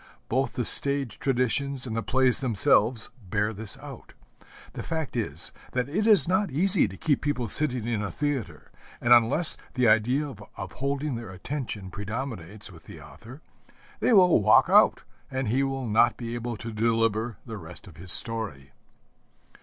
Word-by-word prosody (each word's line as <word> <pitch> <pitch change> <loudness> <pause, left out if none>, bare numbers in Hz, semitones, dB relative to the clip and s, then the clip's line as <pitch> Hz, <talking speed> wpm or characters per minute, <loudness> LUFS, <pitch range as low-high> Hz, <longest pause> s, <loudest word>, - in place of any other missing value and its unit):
Both 130 +3 0
the 125 - -2
stage 140 -1 +2
traditions 135 +1 0
and 115 -3 -5
the 115 - -1
plays 130 +1 +2
themselves 115 -1 +2 0.2
bear 105 +3 0
this 105 0 -6
out. - - -12 0.6
The - - -6
fact 160 -5 -4
is 85 - -4 0.2
that 125 0 -1
it 200 +10 -1
is 210 -5 +5
not 190 +3 +1
easy 180 - +2
to 95 -1 -10
keep 145 -4 0
people 145 -5 -2
sitting 125 -1 0
in 115 -3 -2
a 105 - -3
theatre; 145 -6 -4 0.3
and 120 0 +4
unless 120 +8 +4 0.2
the 125 -2 +2
idea 120 +7 +2 0.3
of 95 - -7
holding 140 +1 -3
their 115 -3 -6
attention 105 -1 -6
predominates 105 -2 -6
with 85 -3 -16
the 80 - -12
author, 115 - -13 0.6
they - - +1
will 180 - +5
walk - - +5
out, - - +4 0.3
and 130 -3 -3
he 130 +5 +1
will 135 -1 -2
not 115 +2 +2
be 115 -1 -6
able 120 -1 -4
to 115 +1 -7
deliver 115 0 0
the 110 -2 -7
rest 85 0 -11
of 90 -7 -15
his 90 +1 -6
story. 100 - +2
120 Hz, 170 wpm, -26 LUFS, 105-135 Hz, 0.6 s, is